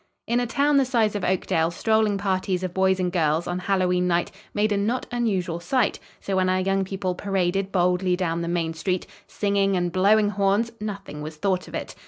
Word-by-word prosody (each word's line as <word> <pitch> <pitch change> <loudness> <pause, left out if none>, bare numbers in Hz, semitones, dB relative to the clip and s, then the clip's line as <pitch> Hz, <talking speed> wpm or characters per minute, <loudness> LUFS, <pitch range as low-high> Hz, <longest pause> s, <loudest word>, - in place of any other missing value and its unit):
In 235 +1 +1
a 245 - -1
town 285 +4 +2
the 275 - +5
size 235 -5 +1
of 205 - -3
Oakdale 170 -3 +1
strolling 215 +3 +1
parties 190 -2 -1
of 185 -1 -3
boys 190 0 +2
and 180 -1 0
girls, 160 -2 +1
on 175 +1 -2
Hallowe'en 180 -1 +1
night, 175 0 +1 0.2
made 210 +1 +1
a - - +2
not 225 +5 -1
unusual 195 -8 -1
sight, 250 +9 0 0.2
so 195 - -3
when 185 0 +2
our 185 0 +2
young 195 +1 +1
people 190 -1 -3
paraded 195 0 -1
boldly 180 0 +2
down 170 -2 -1
the 170 - -3
main 170 -1 -1
street, 180 +3 -2 0.2
singing 200 -1 +1
and 175 -1 -1
blowing 205 +3 +4
horns, 205 +3 +1
nothing 195 -8 -6
was 155 +1 -6
thought 185 +3 -1
of - - -8
it. - - -5
190 Hz, 205 wpm, -24 LUFS, 180-205 Hz, 0.2 s, the